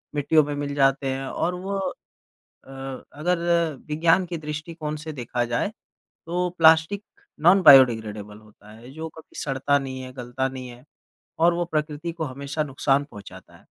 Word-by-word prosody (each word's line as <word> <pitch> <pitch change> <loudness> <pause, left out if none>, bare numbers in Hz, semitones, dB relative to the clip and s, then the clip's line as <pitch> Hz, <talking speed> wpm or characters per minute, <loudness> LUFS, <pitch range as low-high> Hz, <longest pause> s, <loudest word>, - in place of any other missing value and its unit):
मिट्टियों 150 +2 +4
में 145 0 -4
मिल 145 0 -4
जाते 135 0 +2
हैं। 135 0 -4
और 175 +6 -2
वो 195 +2 -4 0.9
अ, 135 - -15 0.4
अगर 175 +4 0 0.5
विज्ञान 165 +4 +3
के 170 -1 -4
दृष्टिकोण 155 0 -5
से 155 +1 -7
देखा 120 -2 -2
जाए, 120 +8 -1 0.6
तो 180 +1 -1
प्लास्टिक 160 +5 +5 0.4
नॉन 180 +4 +6
बायोडिग्रेडेबल 110 - +5
होता 105 -1 -18
है 115 +3 -13
जो 160 +2 -6
कभी 160 - -13
सड़ता 140 0 +1
नहीं 130 -1 -6
है, 130 0 -9
गलता 125 +1 -3
नहीं 130 -1 -8
है 120 +2 -13 0.5
और 170 +1 +4
वो 175 0 0
प्रकृति 155 0 -3
को 165 -1 -4
हमेशा 140 +2 -4
नुकसान 140 0 +1
पहुँचाता 110 -8 -13
है। - - -22
145 Hz, 160 wpm, -24 LUFS, 130-160 Hz, 0.9 s, नॉन